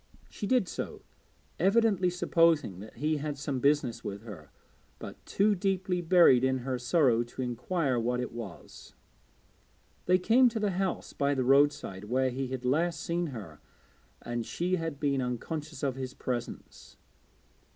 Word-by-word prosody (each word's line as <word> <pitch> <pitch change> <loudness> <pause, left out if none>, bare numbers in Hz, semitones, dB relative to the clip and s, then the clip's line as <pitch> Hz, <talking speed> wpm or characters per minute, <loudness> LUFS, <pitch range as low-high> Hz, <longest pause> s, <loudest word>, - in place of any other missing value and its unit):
She 205 - -5
did 250 -6 +2
so, - - -6 0.6
evidently 195 -1 +3
supposing 165 - +2
that 110 +2 -11
he 155 +1 0
had 145 0 -4
some 140 -2 -3
business 140 -3 +1
with 100 +1 -6
her, 90 -10 -10 0.5
but - - -10
too 205 +2 +2
deeply 185 -1 -1
buried 165 -7 +5
in 130 0 +2
her 130 -2 -2
sorrow 125 -2 +3
to 120 +2 -8
inquire 125 +2 -1
what 125 +2 -1
it 125 - -3
was. 115 -6 -10 1.1
They 180 +1 +5
came 235 +7 +4
to 225 -1 -4
the 210 -2 0
house 190 0 -2
by 140 0 0
the 130 - 0
roadside 135 -7 +2
where 130 +3 +1
he 130 +1 -3
had 130 -1 -5
last 165 +6 +1
seen 170 +1 -2
her 100 - -9 0.6
and 120 -1 -3
she 180 +9 -1
had 165 -4 -4
been 140 -2 +1
unconscious 150 +6 -5
of 135 -2 +1
his 130 0 -5
presence. 120 -2 -6
140 Hz, 155 wpm, -29 LUFS, 125-175 Hz, 1.1 s, buried